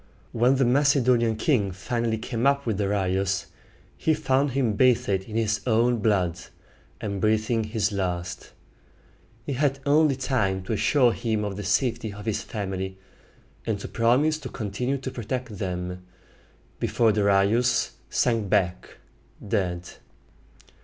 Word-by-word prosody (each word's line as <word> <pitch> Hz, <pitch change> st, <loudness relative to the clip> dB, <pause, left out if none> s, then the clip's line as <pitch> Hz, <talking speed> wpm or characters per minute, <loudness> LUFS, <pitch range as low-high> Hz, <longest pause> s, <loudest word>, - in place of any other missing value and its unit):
When 120 Hz, +3 st, +3 dB
the 135 Hz, -1 st, +2 dB
Macedonian 125 Hz, -3 st, +3 dB
king 110 Hz, -4 st, +1 dB
finally 115 Hz, +4 st, -2 dB
came 115 Hz, +3 st, -1 dB
up 140 Hz, 0 st, +2 dB
with 110 Hz, -4 st, -1 dB
Darius, 95 Hz, -2 st, 0 dB, 0.5 s
he 160 Hz, -, +2 dB
found 135 Hz, 0 st, +1 dB
him 125 Hz, -5 st, +1 dB
bathed 105 Hz, -5 st, +2 dB
in 110 Hz, -, -6 dB
his 110 Hz, -2 st, 0 dB
own 120 Hz, +1 st, +3 dB
blood, 95 Hz, -5 st, +1 dB, 0.6 s
and 100 Hz, -2 st, -4 dB
breathing 110 Hz, +1 st, +1 dB
his 105 Hz, -1 st, -1 dB
last. 90 Hz, -2 st, -3 dB, 0.9 s
He 140 Hz, -, -2 dB
had 140 Hz, +1 st, +1 dB
only 150 Hz, 0 st, +4 dB
time 110 Hz, -8 st, -1 dB
to 110 Hz, -, -3 dB
assure 125 Hz, +3 st, +3 dB
him 110 Hz, -2 st, -1 dB
of 100 Hz, -2 st, -3 dB
the 105 Hz, -, -5 dB
safety 120 Hz, -4 st, 0 dB
of 105 Hz, +1 st, -10 dB
his 110 Hz, -1 st, -1 dB
family, 95 Hz, -3 st, -4 dB, 0.7 s
and 110 Hz, -3 st, -2 dB
to -, -, -6 dB
promise 135 Hz, +7 st, +2 dB
to 135 Hz, -4 st, -7 dB
continue 120 Hz, +6 st, -2 dB
to 130 Hz, 0 st, -6 dB
protect 120 Hz, -3 st, -5 dB
them, 90 Hz, -1 st, -4 dB, 0.8 s
before 115 Hz, -2 st, +2 dB
Darius 105 Hz, +4 st, +2 dB, 0.2 s
sank 115 Hz, -5 st, +1 dB
back 90 Hz, -1 st, 0 dB, 0.5 s
dead. 90 Hz, -4 st, -1 dB
110 Hz, 135 wpm, -25 LUFS, 100-125 Hz, 0.9 s, only